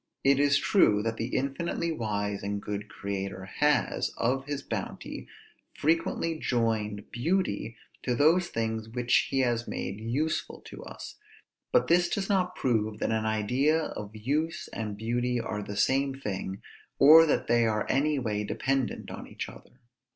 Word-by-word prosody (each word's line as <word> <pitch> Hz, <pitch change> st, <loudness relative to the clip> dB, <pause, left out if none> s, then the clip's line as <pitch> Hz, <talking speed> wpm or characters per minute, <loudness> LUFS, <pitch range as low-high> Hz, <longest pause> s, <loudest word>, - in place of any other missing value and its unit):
It 135 Hz, 0 st, +4 dB
is 140 Hz, 0 st, +4 dB
true 105 Hz, -, +4 dB
that 115 Hz, 0 st, -2 dB
the 115 Hz, -, -2 dB
infinitely 140 Hz, +6 st, -1 dB
wise 105 Hz, -7 st, -2 dB
and 100 Hz, +1 st, -2 dB
good 105 Hz, 0 st, -5 dB
Creator 100 Hz, -1 st, -4 dB
has, 150 Hz, 0 st, +2 dB
of 135 Hz, +3 st, 0 dB
his 145 Hz, -1 st, -4 dB
bounty, -, -, -5 dB, 0.5 s
frequently 165 Hz, +1 st, 0 dB
joined 110 Hz, -5 st, -1 dB
beauty 120 Hz, -, -1 dB, 0.2 s
to 125 Hz, -, 0 dB
those 165 Hz, +7 st, +4 dB
things 110 Hz, -1 st, -3 dB
which 125 Hz, +1 st, +2 dB
he 135 Hz, -, +1 dB
has 120 Hz, -2 st, 0 dB
made 100 Hz, -, -4 dB
useful 135 Hz, +8 st, -2 dB
to -, -, -10 dB
us; -, -, -9 dB, 0.5 s
but -, -, +4 dB
this 175 Hz, +1 st, +4 dB
does 200 Hz, -1 st, -2 dB
not 185 Hz, -2 st, +1 dB
prove 110 Hz, -4 st, 0 dB
that -, -, -1 dB
an 110 Hz, 0 st, 0 dB
idea 125 Hz, +9 st, +2 dB
of 105 Hz, -9 st, -6 dB
use 150 Hz, +9 st, -1 dB
and 105 Hz, -2 st, -5 dB
beauty 120 Hz, +2 st, 0 dB
are 105 Hz, -2 st, -3 dB
the 100 Hz, 0 st, -6 dB
same 135 Hz, +5 st, +2 dB
thing, 95 Hz, -4 st, -4 dB, 0.3 s
or 160 Hz, +3 st, +9 dB
that -, -, +1 dB
they 120 Hz, -1 st, +3 dB
are 110 Hz, -1 st, 0 dB
any 145 Hz, +2 st, +2 dB
way 105 Hz, -5 st, -1 dB
dependent 135 Hz, +4 st, -1 dB
on -, -, -8 dB
each -, -, -6 dB
other. 125 Hz, -, -15 dB
120 Hz, 160 wpm, -28 LUFS, 105-145 Hz, 0.5 s, or